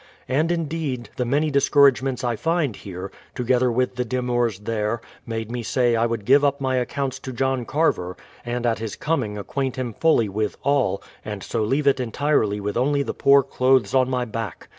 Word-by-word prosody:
And 155 +6 +1
indeed, 155 -8 -3
the 125 - 0
many 145 +5 +1
discour 140 0 +5
agements 130 0 -4
I 120 -1 0
find 160 - 0
here, 95 0 -7 0.2
together 125 0 +2
with 125 +1 0
the 125 - +1
demurs 120 -4 -1
there, 105 +1 -1 0.3
made 115 0 -4
me 120 0 -3
say 120 +1 +1
I 115 +1 +2
would 115 -3 -3
give 140 +4 +5
up 140 -1 +2
my 130 -1 0
accounts 130 +1 -2
to 130 - -7
John 130 0 -1
Carver, 90 - 0 0.3
and 120 0 -3
at 115 -2 +1
his 110 -2 -4
com 160 -2 0
ing 105 -1 -5
acquaint 130 +6 -3
him 125 -3 -3
fully 140 -5 +3
with 105 +2 -2
all, 135 -9 +1 0.2
and 105 -2 -6
so - - -2
leave 135 +7 0
it 140 -1 +4
entirely 120 -4 0
with 105 +1 -3
only 140 +3 +2
the - - -4
poor 140 0 +5
clothes 130 -1 +2
on 130 -1 +3
my 125 -1 0
back. 110 -5 -6
125 Hz, 200 wpm, -23 LUFS, 115-140 Hz, 0.3 s, discour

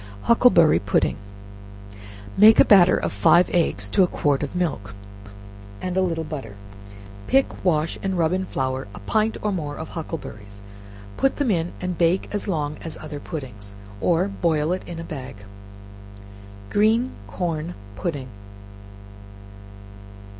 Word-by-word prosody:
Huckleberry 230 -9 +5
Pudding. 100 - +1 1.2
Make 215 +2 +7
a - - +8
batter 185 -4 +6
of - - -2
five 170 - +4
eggs 105 - 0
to - - +3
a 180 - +5
quart 145 -5 0
of 145 +4 -4
milk, 125 - -2 0.8
and 185 -1 -4
a 190 - +3
little 165 -3 -1
butter; 135 -10 -7 0.7
pick, 270 0 +1
wash, 165 -3 +1
and 190 -1 -2
rub 165 0 +2
in 190 0 -1
flour 130 - -3
a - - -8
pint 215 - 0
or 210 - +1
more 150 -6 -3
of 160 - -7
huckleberries, 105 - -7 0.5
put 270 - +2
them 280 -6 0
in, 170 -2 -1
and 180 -2 -4
bake 175 +2 +2
as 205 - -2
long 150 -5 -2
as 165 - -6
other 150 -2 -7
puddings, 110 - -7 0.3
or 175 +2 +2
boil 165 -5 0
it 185 - -4
in 170 -1 -7
a - - -5
bag. 135 -7 -7 1.4
Green 220 +4 +3 0.2
Corn 160 - -3 0.2
Pudding. 140 - -4
165 Hz, 140 wpm, -23 LUFS, 145-185 Hz, 1.4 s, a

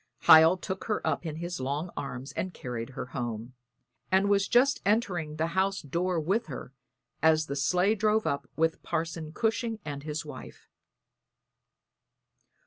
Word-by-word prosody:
Hiel 160 +3 +8
took 190 +1 -5
her 215 - -1
up 170 - -1
in 155 - -4
his 175 0 -4
long 145 +6 -2
arms 135 0 -5
and 185 +6 -4
carried 120 -2 -5
her - - -3
home, 120 -1 -4 0.6
and 190 +2 +4
was 200 -1 +3
just 265 +4 +3
entering 185 -8 0
the 155 +1 0
house 195 +1 +1
door 170 +5 -1
with 195 +9 0
her 135 - -8 0.5
as 160 0 +4
the 140 - -4
sleigh 180 +8 +2
drove 215 +1 +1
up 140 -1 -2
with 160 0 +1
Parson 160 -1 -3
Cushing 225 +3 -1
and 145 -2 -5
his 155 +2 -4
wife. - - -10
165 Hz, 150 wpm, -29 LUFS, 145-195 Hz, 0.6 s, Hiel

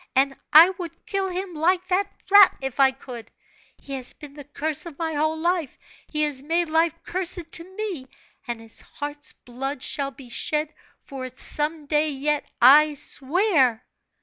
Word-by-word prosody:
and 270 +1 +3 0.2
I 330 +5 +9
would 335 -2 -8
kill 390 -1 -1
him, 365 0 -4
like 350 +4 +1
that 390 +2 0 0.2
rat, 405 -1 +7
if 270 -1 -5
I 270 -1 +7
could! 255 -3 -10 0.5
He 275 - -9
has 260 -2 -4
been 295 -2 -12
the 290 0 -10
curse 300 +2 -3
of 305 -4 -11
my 325 -1 -3
whole 310 +2 0
life; 340 -2 -1 0.3
he 305 -1 0
has 290 -3 +1
made 330 +3 -1
life 325 0 +2
cursed 350 -2 -2
to 360 +3 -4
me; 380 -11 -4 0.4
and 240 -1 -3
his 225 0 -6
heart's 290 0 -7
blood 260 +2 -6
shall 280 -1 -2
be 265 -2 -14
shed 300 +5 -2 0.3
for 270 -2 -7
it 255 0 -10
some 300 +1 +2
day 300 +1 +1
yet, 290 +1 -1 0.2
I 295 +4 +7
swear!" 275 - +1
300 Hz, 175 wpm, -23 LUFS, 270-340 Hz, 0.5 s, I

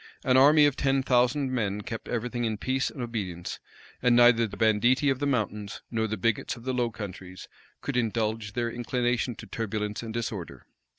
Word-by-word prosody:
An 130 -2 +3
army 145 +3 +7
of 145 -2 +2
ten 135 -1 +1
thousand 130 +2 +2
men[] 105 -5 -1
kept 115 +2 -6
everything 120 +1 -2
in 110 -2 -1
peace 130 +5 0
and 130 - -6
obedience; 95 -7 -4 0.4
and 125 -1 +4
neither 120 -1 +6
the - - -10
banditti 120 +5 +3
of 130 - -2
the 145 - 0
mountains 105 -5 -2
nor 110 -1 0
the 110 +1 -3
bigots 115 +3 0
of 120 - -13
the 130 +1 -2
Low 120 -1 +1
Countries 95 -4 -8 0.3
could 145 - -4
indulge 110 -2 -1
their 120 -1 -1
inclination 120 0 -1
to - - -10
turbulence 105 -2 -3
and 115 -1 -6
disorder. 110 -6 -5
115 Hz, 185 wpm, -27 LUFS, 110-125 Hz, 0.4 s, army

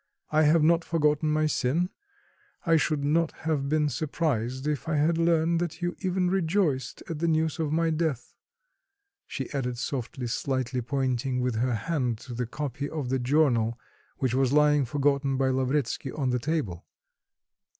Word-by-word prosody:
"I 155 0 +4
have 155 +1 +4
not 165 +1 +4
forgotten 150 -2 +1
my 155 0 +2
sin; 155 +4 +1 0.8
I 165 -2 +4
should 155 -2 +1
not 160 +3 +2
have 150 -4 0
been 155 0 +2
surprised 130 -2 -2
if 150 +1 -2
I 155 - +1
had 160 +3 +2
learnt 165 0 +2
that 175 0 -4
you 175 0 -1
even 185 -1 0
rejoiced 175 -6 0
at 160 -3 -4
the 170 - +1
news 160 0 +1
of 155 -2 -1
my 165 +1 +2
death," 155 -6 -2 0.9
she 135 -3 -4
added 125 -3 -2
softly, 125 0 -4
slightly 130 +1 -1
pointing 130 0 -1
with 125 -1 0
her 125 +1 +1
hand 125 0 -1
to 125 - -8
the 120 0 -3
copy 145 +2 -4
of 150 -6 -4
the 130 0 +1
journal 120 -4 +2 0.4
which 130 -3 0
was 130 -1 +2
lying 150 -1 +4
forgotten 140 0 +1
by 135 0 +2
Lavretsky 130 +1 -1
on 135 -4 -1
the 125 - +1
table. 130 - -2
145 Hz, 165 wpm, -27 LUFS, 130-160 Hz, 0.9 s, I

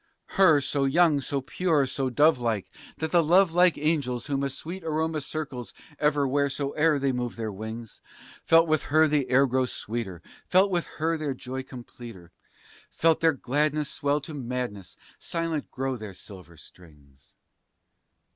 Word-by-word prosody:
Her, 170 -7 +5
so 140 0 0
young, 150 0 +3
so 140 0 -2
pure, 150 +1 +1
so 135 0 -2
dove 145 +2 +4
like, 110 -6 -1 0.3
that 160 0 -3
the 175 -1 +4
love 175 +3 +4
like 175 0 +4
angels 145 -6 -1
whom 140 -1 -1
a 140 - -1
Sweet 170 +7 -7
aroma 160 0 -1
circles 140 -5 -6 0.2
ever 145 -2 +2
wheresoe'er 140 +3 +1
they 140 -1 0
move 125 -1 -3
their 110 -2 -4
wings, 110 +2 -8 0.4
Felt 165 0 +5
with 155 -2 +2
her 155 +2 +5
the 145 -3 0
air 135 +2 +5
grow 130 0 0
sweeter, 105 -8 -5 0.2
felt 190 +2 +4
with 175 -2 0
her 165 +1 0
their 145 -3 -2
joy 130 +1 -5
completer, 120 -7 -11 0.6
Felt 165 -1 +2
their 165 -1 +3
gladness 145 +3 -1
swell 145 +1 0
to 155 - -9
madness, 125 - -5 0.2
silent 165 -3 -3
grow 135 0 -3
their 105 -4 -8
silver 90 -3 -12
strings. 70 -6 -19
140 Hz, 155 wpm, -26 LUFS, 120-155 Hz, 0.6 s, Her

